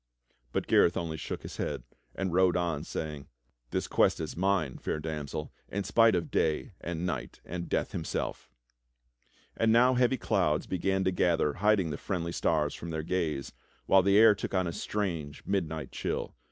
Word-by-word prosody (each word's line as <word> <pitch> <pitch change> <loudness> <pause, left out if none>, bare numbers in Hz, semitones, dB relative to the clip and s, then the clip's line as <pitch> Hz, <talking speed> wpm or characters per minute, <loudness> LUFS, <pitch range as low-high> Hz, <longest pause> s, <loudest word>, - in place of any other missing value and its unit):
But - - -1
Gareth 85 - +4
only 80 -2 -2
shook - - -5
his - - -8
head, - - -3 0.3
and 95 -3 -2
rode 90 0 +4
on 85 -4 -1
saying: 75 -4 -5 0.4
"This - - -2
quest - - +3
is 80 -2 -4
mine. 90 -6 0
Fair - - -2
Damsel, 75 -1 -5 0.2
in 100 +1 -2
spite 115 -1 +4
of 85 - -2
Day 80 -1 0
and 85 +1 -3
Night 90 - -4
and 85 0 -5
Death - - 0
himself." 80 -6 -4 1.1
And 115 0 +3
now 125 +3 +5
heavy 125 +1 +3
clouds 75 -8 +1
began 95 +1 0
to 95 - +2
gather 85 -4 +2
hiding 100 -3 +2
the 75 - -3
friendly 85 -4 -2
stars 75 -3 +1
from 85 - -7
their 80 -1 -3
gaze, 80 -6 -2 0.3
while 95 - +6
the 100 +2 +4
air 110 0 +8
took 100 - -4
on 95 -1 +2
a 85 - -3
strange, 85 -8 -3
midnight 80 -7 -2
chill. - - -3
85 Hz, 175 wpm, -30 LUFS, 80-95 Hz, 1.1 s, air